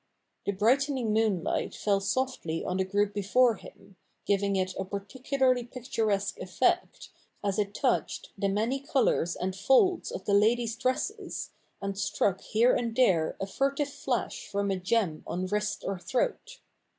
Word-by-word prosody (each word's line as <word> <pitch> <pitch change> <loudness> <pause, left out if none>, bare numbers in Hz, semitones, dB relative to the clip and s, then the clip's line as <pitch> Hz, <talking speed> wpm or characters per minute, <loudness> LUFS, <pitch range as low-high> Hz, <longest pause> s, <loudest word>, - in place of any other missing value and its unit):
The - - +3
brightening 245 +3 +2
moon 215 -6 +2
light - - -1
fell 200 -2 +1
softly 200 -6 -2
on 180 - -1
the 190 - +2
group 205 +2 0
before 220 +4 +3
him, 190 - -15 0.3
giving 200 0 +1
it 185 -1 0
a - - 0
par 200 +1 -4
ticularly 255 +2 0
picturesque 220 -6 -1
effect, - - 0 0.3
as 200 +1 0
it 205 0 -1
touched - - 0
the 200 - 0
many 225 +7 0
colours 260 - +1
and 185 +1 -3
folds 270 - +3
of 190 - -6
the 200 - +1
ladies' 225 +3 +3
dresses, 380 - -2 0.3
and 195 0 -2
struck 195 -1 0
here 235 +3 +3
and 230 -2 -1
there 185 -11 +3
a - - -1
furtive 275 +7 0
flash - - -3
from 200 0 -1
a 190 - 0
gem 185 -3 0
on 180 +1 -2
wrist 210 +1 -2
or 195 -2 -2
throat. - - -2
210 Hz, 160 wpm, -29 LUFS, 195-255 Hz, 0.3 s, The